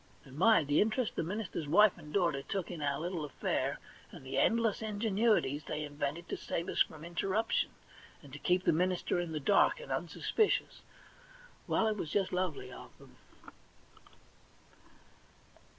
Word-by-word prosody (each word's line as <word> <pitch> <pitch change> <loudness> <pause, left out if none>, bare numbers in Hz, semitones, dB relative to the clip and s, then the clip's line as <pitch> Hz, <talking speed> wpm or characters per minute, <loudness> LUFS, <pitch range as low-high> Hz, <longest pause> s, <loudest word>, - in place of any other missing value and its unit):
And 135 -1 -13
my! 190 +2 +5
the 145 +1 +2
interest 220 +2 0
the - - 0
minister's 175 -3 -4
wife 210 +6 +5
and 150 -4 -12
daughter 170 -7 +1
took 185 +5 -4
in 170 -3 -6
our 140 -1 0
little 170 0 -3
affair, 145 - -2 0.3
and - - -12
the 130 - -1
endless 225 -2 +2
ingenuities 210 - +1
they 150 - -3
invented 145 +3 -4
to - - -3
save 170 - -3
us - - +1
from 160 0 -1
interruption, 195 +6 0 0.5
and 140 -2 -14
to 145 - -7
keep 180 +4 +1
the - - +3
minister 180 +1 0
in 175 -2 -3
the 155 - -2
dark 200 - +3
and - - -9
unsuspicious 435 -2 0 0.4
— - - -24
well, - - +2
it 215 -1 0
was 160 - -4
just 195 +3 0
lovely 180 -5 -2
of - - -12
them - - -17
180 Hz, 165 wpm, -32 LUFS, 150-215 Hz, 0.5 s, my